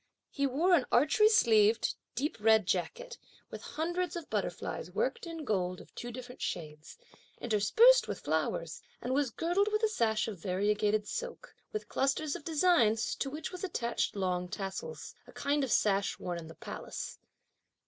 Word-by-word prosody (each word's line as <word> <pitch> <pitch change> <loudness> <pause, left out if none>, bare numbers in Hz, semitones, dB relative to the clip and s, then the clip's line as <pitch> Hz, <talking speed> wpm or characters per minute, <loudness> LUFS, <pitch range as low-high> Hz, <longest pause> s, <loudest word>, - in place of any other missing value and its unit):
He 280 -1 0
wore 320 +8 +2
an 295 -7 +4
archery 305 - +5
sleeved 225 - +4 0.2
deep 285 +5 -1
red 220 0 +5
jacket, - - -2 0.3
with - - -7
hundreds 345 +3 -2
of 335 -3 -7
butterflies - - -3
worked 470 -6 -2
in 330 -2 -6
gold 185 -5 -1
of - - -15
two 240 - -6
different 250 +1 -9
shades, 155 -2 -5 0.4
interspersed 240 - +5
with - - -5
flowers; - - -2 0.2
and 255 - -2
was 280 -1 +2
girded 350 - +1
with 425 +1 0
a - - +6
sash 225 - +1
of 205 -5 -6
variegated 210 +3 +1
silk, - - -6 0.2
with 430 - -4
clusters 280 +2 0
of 345 - -7
designs, 290 -9 +3
to 275 - -2
which 305 +5 -5
was 365 0 -8
attached 240 - -1
long 180 -2 -1
tassels; 195 - -5
a - - -13
kind 285 0 0
of 260 - -2
sash 200 -1 +2
worn 175 -1 -4
in 160 - -9
the 165 - -11
palace. - - -7
255 Hz, 165 wpm, -31 LUFS, 210-345 Hz, 0.4 s, a